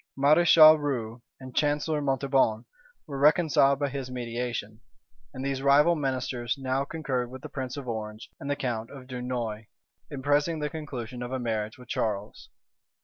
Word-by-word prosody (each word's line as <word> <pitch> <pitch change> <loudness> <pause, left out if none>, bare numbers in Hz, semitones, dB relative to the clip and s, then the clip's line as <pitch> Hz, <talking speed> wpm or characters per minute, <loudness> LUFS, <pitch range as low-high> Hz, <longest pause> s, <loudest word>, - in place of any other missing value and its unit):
Mareschal 155 +2 +7
Rieux 125 -5 -3 0.2
and 130 -1 -11
Chancellor 150 +1 +1
Montauban 135 -5 +1 0.4
were 140 -4 -6
reconciled 145 -2 +4
by 140 0 -1
his 135 -1 -5
mediation; 120 -3 -4 0.5
and 130 +1 -6
these 135 -1 -2
rival 145 +5 +5
ministers 130 -4 -2
now 135 0 -1
concurred 135 -5 -3
with 130 +1 -10
the - - -7
prince 130 -1 -5
of 140 -3 -7
Orange 110 -1 -6
and 140 - -6
the 145 - +1
count 115 -5 -3
of 135 -2 -11
Dunois, 125 -4 -4 0.4
in 140 -3 -7
pressing 145 +3 +2
the 150 -1 -3
conclusion 130 -7 -6
of 120 +1 -5
a 130 - -1
marriage 110 -3 -3
with 125 -1 -14
Charles. 105 -3 -3
130 Hz, 160 wpm, -27 LUFS, 120-145 Hz, 0.5 s, Mareschal